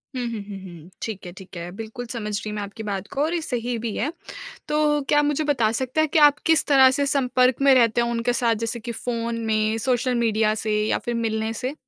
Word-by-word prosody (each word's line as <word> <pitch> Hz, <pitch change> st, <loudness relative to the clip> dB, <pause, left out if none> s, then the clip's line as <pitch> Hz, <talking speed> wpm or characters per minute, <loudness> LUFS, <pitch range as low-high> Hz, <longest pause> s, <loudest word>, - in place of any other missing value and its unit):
हुँ, 250 Hz, -1 st, -2 dB
हुँ, 215 Hz, -3 st, -4 dB
हुँ, 195 Hz, -, -6 dB
हुँ। 175 Hz, -2 st, -11 dB
ठीक 210 Hz, -5 st, -5 dB
है, 175 Hz, -, -7 dB
ठीक 190 Hz, -2 st, -11 dB
है। 170 Hz, +1 st, -6 dB
बिल्कुल 225 Hz, +2 st, -7 dB
समझ 210 Hz, -4 st, -4 dB
रही 215 Hz, 0 st, -5 dB
मैं 205 Hz, -, -3 dB
आपकी 205 Hz, +2 st, -7 dB
बात 200 Hz, -1 st, -4 dB
को 280 Hz, -, -1 dB
और 325 Hz, +3 st, 0 dB
ये 340 Hz, -, -1 dB
सही 245 Hz, -4 st, -2 dB
भी 220 Hz, -, -3 dB
है। 290 Hz, +8 st, -1 dB, 0.6 s
तो 300 Hz, -1 st, +2 dB
क्या 295 Hz, -, +4 dB
आप 295 Hz, -, +4 dB
मुझे 295 Hz, +1 st, 0 dB
बता 250 Hz, -7 st, +2 dB
सकते 260 Hz, +4 st, -1 dB
हैं 315 Hz, -, +2 dB
कि -, -, +4 dB
आप 295 Hz, -1 st, +6 dB
किस 320 Hz, -1 st, +4 dB
तरह 265 Hz, -2 st, +6 dB
से 280 Hz, -, +1 dB
संपर्क 255 Hz, -2 st, +2 dB
में 275 Hz, -1 st, +6 dB
रहते 235 Hz, -1 st, +4 dB
हैं 235 Hz, -, +1 dB
उनके 235 Hz, +1 st, 0 dB
साथ? 235 Hz, -1 st, +2 dB
जैसे 230 Hz, +1 st, -3 dB
कि 235 Hz, +1 st, -5 dB
फ़ोन 230 Hz, 0 st, -3 dB
में, 215 Hz, 0 st, +1 dB
सोशल 250 Hz, +2 st, 0 dB
मीडिया 220 Hz, -2 st, +2 dB
से 210 Hz, -1 st, +1 dB
या -, -, +1 dB
फिर 240 Hz, -, -2 dB
मिलने 220 Hz, -1 st, -1 dB
से? 255 Hz, +5 st, -4 dB
235 Hz, 250 wpm, -23 LUFS, 215-265 Hz, 0.6 s, आप